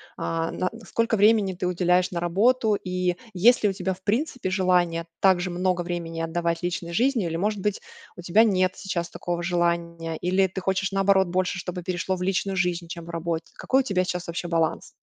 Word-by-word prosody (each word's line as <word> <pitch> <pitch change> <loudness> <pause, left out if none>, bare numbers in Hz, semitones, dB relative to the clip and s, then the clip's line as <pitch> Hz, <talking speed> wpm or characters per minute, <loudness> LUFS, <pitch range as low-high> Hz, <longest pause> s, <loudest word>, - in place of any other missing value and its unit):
а 165 0 -2
на 185 - -1 0.2
сколько 230 -1 +1
времени 205 -2 +4
ты 180 +1 -4
уделяешь 180 0 +2
на 175 - -2
работу 215 +6 +2
и 180 -2 -1 0.2
есть 225 +7 +4
ли 210 - +4
у 195 - -2
тебя 190 -1 -2
в 190 - -25
принципе 235 -2 -1
желание 180 -3 +2
также 185 -2 +3
много 180 0 0
времени 170 -1 -4
отдавать 170 0 -1
личной 170 -1 -3
жизни, 240 -1 +2
или 165 -1 -2
может 205 +3 -1
быть 210 0 -1 0.3
у 175 - -9
тебя 190 +6 +4
нет 185 -4 +2
сейчас 170 -3 -3
такого 175 0 -4
желания? 170 -2 -1
Или 185 +2 +2
ты 190 +1 -4
хочешь 190 +1 0
наоборот 195 -1 +3
больше, 185 +1 0
чтобы 180 0 -5
перешло 185 +1 -2
в 180 - -8
личную 195 +1 0
жизнь, 180 -2 -1
чем 170 -1 -7
в 170 - -12
работе? 165 -1 -3
Какой 265 - +1
у - - +2
тебя 195 -7 +1
сейчас 180 -1 -4
вообще 170 +1 -4
баланс? 165 -2 0
180 Hz, 200 wpm, -25 LUFS, 170-195 Hz, 0.3 s, времени